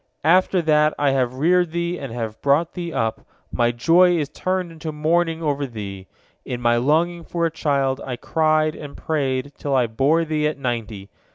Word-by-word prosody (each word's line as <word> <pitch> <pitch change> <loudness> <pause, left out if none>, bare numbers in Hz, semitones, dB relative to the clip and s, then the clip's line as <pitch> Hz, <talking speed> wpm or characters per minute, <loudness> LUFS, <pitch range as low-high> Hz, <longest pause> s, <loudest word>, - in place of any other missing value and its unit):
After 180 +1 +3
that 150 -1 +3
I 145 -1 +2
have 130 -2 0
reared 175 +4 +2
thee 170 +1 -2
and 135 -4 -6
have 115 -2 -5
brought 150 +4 +2
thee 175 -2 -5
up, 110 -7 -2 0.3
my 120 0 +1
joy 175 +9 +4
is 145 -3 -2
turned 185 +2 -2
into 160 -1 -6
mourning 165 +2 0
over 145 -2 -1
thee. 100 -5 -8 0.4
In 125 - -5
my 120 -1 +2
longing 165 +7 +1
for 170 0 -2
a 165 - 0
child, 140 -4 0
I 125 - -4
cried 155 +3 +1
and 145 -2 -9
prayed, 140 -3 -2
till 140 -2 -1
I 125 -2 +3
bore 140 +9 +1
thee 155 -1 0
at 150 - -3
ninety. 115 -6 -4
150 Hz, 185 wpm, -22 LUFS, 130-165 Hz, 0.4 s, joy